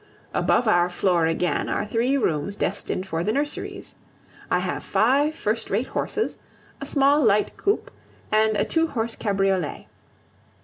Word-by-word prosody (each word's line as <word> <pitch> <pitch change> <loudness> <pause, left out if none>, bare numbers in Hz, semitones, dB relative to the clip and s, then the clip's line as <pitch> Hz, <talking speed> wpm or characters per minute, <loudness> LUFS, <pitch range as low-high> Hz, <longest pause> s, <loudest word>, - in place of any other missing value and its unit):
Above 245 - +2
our 175 -4 +4
floor 175 -2 +1
again 165 +2 0
are - - -1
three 240 +6 +1
rooms 185 - -1
destined 185 - -2
for 165 -3 -2
the 215 - 0
nurseries. 290 +4 -3 0.6
I - - +3
have - - -3
five 285 +7 +2
first 225 -6 -2
rate 215 +6 0
horses, 435 - -2 0.4
a - - -5
small 285 +1 +3
light 210 -2 +2
coupe, 405 +1 -1 0.4
and 215 0 +3
a - - +1
two 325 0 +1
horse 230 -6 -2
cabriolet. 195 -5 -1
215 Hz, 145 wpm, -24 LUFS, 190-275 Hz, 0.6 s, our